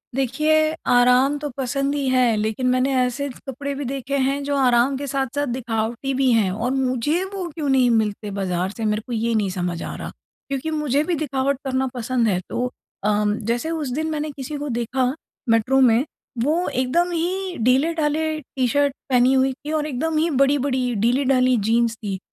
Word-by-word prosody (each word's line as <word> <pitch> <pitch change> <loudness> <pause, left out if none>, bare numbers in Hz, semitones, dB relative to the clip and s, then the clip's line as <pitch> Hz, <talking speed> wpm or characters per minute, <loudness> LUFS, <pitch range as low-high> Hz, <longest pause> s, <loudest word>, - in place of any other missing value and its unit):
देखिए, 305 +4 +2
आराम 250 +4 +4
तो 295 0 -4
पसंद 275 +2 -1
ही 280 -2 -1
है। 250 -3 +3
लेकिन 220 +4 -1
मैंने 255 +2 +2
ऐसे 255 +3 0 0.2
कपड़े 280 +2 -4
भी 280 0 -4
देखे 275 +1 -3
हैं 275 +1 +1
जो 285 0 -1
आराम 255 0 +3
के 285 +1 -5
साथ-साथ 275 +1 -1
दिखावटी 235 +2 -2
भी 265 -1 +2
हैं 210 -5 +2
और 225 +6 -2
मुझे 265 +6 0
वो 380 -3 -3
क्यों 300 -4 -2
नहीं 260 -2 +4
मिलते 210 -2 0
बाज़ार 185 -2 -1
से 225 - -2
मेरे 210 0 0
को 245 - -4
ये 230 +1 0
नहीं 210 -3 +1
समझ 180 -2 -3
आ - - -5
रहा। - - -6 0.4
क्योंकि 275 +3 -2
मुझे 300 -2 +1
भी 345 +2 -1
दिखावट 275 -2 -1
करना 265 0 0
पसंद 245 -1 0
है। 185 -4 +1
तो 250 +1 -2 0.3
अ, 210 - +2 0.2
जैसे 230 +7 -1
उस 310 -5 -2
दिन 315 +3 -1
मैंने 305 0 -2
किसी 280 +1 -6
को 290 +1 -4
देखा 240 +2 0 0.4
मेट्रो 230 +4 +3
में 245 +1 +4 0.4
वो 325 +6 +1
एकदम 275 +8 +1
ही 360 +2 -2
ढीले-ढाले 310 +4 +1
टी-शर्ट 270 +1 0 0.2
पहनी 250 0 +4
हुई 265 0 +3
थी 295 +3 -8
और 310 -1 0
एकदम 310 +4 -1
ही 325 +2 +2
बड़ी-बड़ी 275 -1 +2 0.2
ढीले-ढाली 255 +1 +3
जीन्स 230 0 +2
थी। 205 -4 -4
265 Hz, 185 wpm, -22 LUFS, 235-285 Hz, 0.4 s, आराम